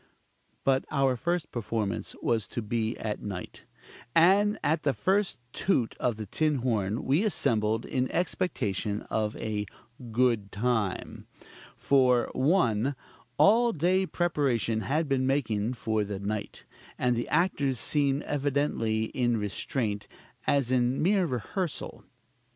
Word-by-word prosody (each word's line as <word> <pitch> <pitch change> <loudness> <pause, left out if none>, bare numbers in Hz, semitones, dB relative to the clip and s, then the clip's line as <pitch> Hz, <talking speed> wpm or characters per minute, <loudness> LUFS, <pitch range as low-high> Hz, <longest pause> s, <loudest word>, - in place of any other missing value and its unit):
But 135 0 +3
our 135 -2 +2
first 170 +5 -2
performance 110 -3 -3
was 110 -5 +1
to 120 - -4
be 115 +1 -1
at 105 -2 -4
night: 95 -3 -7 0.5
and 200 +5 +5
at 155 +1 +1
the 140 -2 +1
first 195 +1 +1 0.2
toot 130 -12 +1
of 120 -3 0
the 110 0 -6
tin 155 +8 0
horn 110 -2 0
we 145 +9 +3
assembled 115 - +1
in 130 0 -1
expectation 110 - -1
of 110 -1 0
a 105 -2 -3 0.4
"good 115 -4 +1
time." 110 -3 -2 0.5
For, 125 -3 +3
1. 135 - +2 0.4
All 235 +3 +5
day 185 +4 +2
preparation 135 -11 0
had 150 +9 0
been 130 -1 +1
making 120 -5 0
for 110 -2 0
the 100 -1 -4
night; 105 +1 -4 0.3
and 125 -1 +1
the 120 - -2
actors 145 -5 +1
seemed 140 -1 +1
evidently 140 -6 0
in 120 +1 0
restraint, 105 +1 -2 0.4
as 135 -3 +2
in 125 +1 +2
mere 190 +1 +3
rehearsal: 155 - -3
2. - - -22
125 Hz, 130 wpm, -28 LUFS, 110-150 Hz, 0.5 s, and